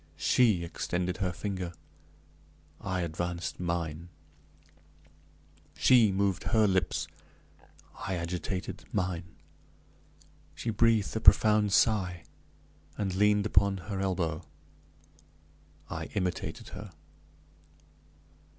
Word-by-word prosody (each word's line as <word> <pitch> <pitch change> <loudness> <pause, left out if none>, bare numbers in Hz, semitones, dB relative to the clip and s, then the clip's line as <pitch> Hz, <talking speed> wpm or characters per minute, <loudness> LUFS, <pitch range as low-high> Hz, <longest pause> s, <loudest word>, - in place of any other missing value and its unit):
She 110 -9 +3
extended 90 +1 -2
her 95 -2 -1
finger 95 -1 -4 1.1
I 95 -3 -2
advanced 85 +1 -3
mine. 85 -1 -3 1.7
She 120 -5 +5
moved 95 -1 0
her 110 -2 +3
lips 95 -2 0 0.9
I 95 - -3
agitated 90 +2 -4
mine. 90 -2 -1 1.3
She 115 - -3
breathed 110 -1 +2
a - - +1
profound 105 -2 +6
sigh, 95 -6 +2 0.7
and 95 -3 -1
leaned 105 +1 +3
upon 100 -1 +3
her 95 +2 -5
elbow. 90 -4 -1 1.4
I - - -5
imitated 90 -3 -3
her. 105 -4 -9
95 Hz, 85 wpm, -30 LUFS, 90-105 Hz, 1.7 s, profound